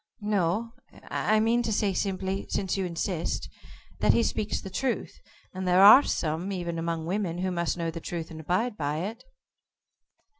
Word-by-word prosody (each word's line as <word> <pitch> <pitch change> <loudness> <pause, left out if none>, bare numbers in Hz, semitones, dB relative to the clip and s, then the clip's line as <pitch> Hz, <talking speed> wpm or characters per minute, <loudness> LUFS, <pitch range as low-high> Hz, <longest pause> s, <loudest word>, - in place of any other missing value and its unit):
"No, 210 +2 0 0.4
I 215 0 +2
mean 230 +2 +2
to 230 -2 -2
say 205 -2 +1
simply 190 0 -2
since 190 -2 -1
you 195 -1 -1
insist 170 0 -2 0.5
that - - +4
he 235 - +3
speaks 215 -2 -1
the 190 - -9
truth, 255 +5 -2 0.3
and 185 0 -4
there 180 +2 +5
are 215 +7 +11
some 165 - -2
even 170 -3 -3
among 165 -1 -2
women 180 -1 -2
who 185 +1 -1
must 170 -1 -1
know 165 -1 -2
the 165 0 -7
truth 165 -1 -5
and 160 - -8
abide 185 +9 -1
by 150 +1 -2
it." 210 +5 -5
185 Hz, 175 wpm, -27 LUFS, 170-210 Hz, 0.5 s, are